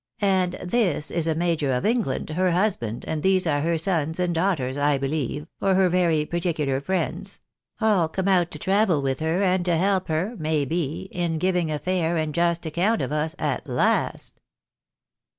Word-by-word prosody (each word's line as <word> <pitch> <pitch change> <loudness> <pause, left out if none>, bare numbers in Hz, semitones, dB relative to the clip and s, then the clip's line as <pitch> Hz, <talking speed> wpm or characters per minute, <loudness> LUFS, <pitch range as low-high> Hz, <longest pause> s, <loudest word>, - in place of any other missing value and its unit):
" - - -49
And 190 -3 +2
this 180 -6 -1
is 165 -1 0
a 160 - +1
major 165 -4 0
of 125 -1 -1
England, 215 - 0
her 185 +3 +1
husband, 170 - -1
and 155 -1 -2
these 190 +1 +3
are 145 -3 +1
her 165 +2 +1
sons 160 -1 -1
and 180 -1 +1
daughters, 165 -7 0
I 145 0 +2
believe, 145 +1 -2 0.2
or 195 -1 +3
her 190 -1 +4
very 170 -4 +2
particular 155 -6 -1
friends; 190 +6 -2 0.4
aU 210 -7 +3
come 190 +4 -3
out 180 -3 +3
to - - -8
travel 195 -6 +2
with 135 -1 -1
her, 160 +5 0
and 185 -1 +2
to 175 -2 +2
help 190 +1 +1
her, 175 +9 -1
may 155 -2 0
be, 160 0 -2
in 170 -2 -1
giving 180 -1 0
a 150 - -1
fair 170 +1 0
and 155 -1 -1
just 170 0 +1
account 180 +8 +1
of - - -3
us 155 +2 -1
at - - -2
last." - - 0
170 Hz, 185 wpm, -24 LUFS, 155-185 Hz, 0.4 s, her